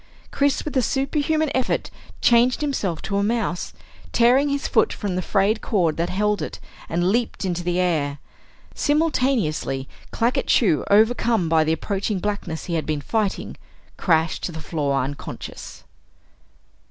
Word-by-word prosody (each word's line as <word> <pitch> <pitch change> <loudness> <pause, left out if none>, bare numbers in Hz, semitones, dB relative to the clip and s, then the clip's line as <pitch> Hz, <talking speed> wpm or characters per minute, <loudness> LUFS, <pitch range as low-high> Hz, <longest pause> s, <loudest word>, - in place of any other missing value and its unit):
Chris, 280 0 +1
with 300 - -5
a 260 - +4
superhuman 290 +4 0
effort, 260 -1 -1 0.3
changed 240 +3 +4
himself 215 - -2
to 200 - -1
a 200 - +1
mouse, 215 -5 -1 0.4
tearing 255 +5 +4
his 280 +1 -1
foot - - +3
from 200 -4 -3
the 185 - 0
frayed 200 +4 +1
cord 175 -8 +1
that 170 +1 -1
held 210 +2 0
it, - - -5 0.3
and 175 +3 +1
leaped 230 -2 -1
into 175 -1 -2
the 175 +1 0
air. 155 -6 0 0.6
Simultaneously, 250 - 0 0.2
Claggett 235 +2 0
Chew, 180 - +3
overcome 220 -2 +3
by 160 -1 +4
the 160 +1 +1
approaching 200 +4 -2
blackness 185 -4 -3
he 175 - -4
had 160 -2 -1
been 155 -1 -1
fighting, 210 +5 -2 0.4
crashed 160 -2 +1
to - - -3
the 160 - -7
floor 145 -3 -1
unconscious. 140 +2 -7
200 Hz, 150 wpm, -23 LUFS, 165-240 Hz, 0.6 s, a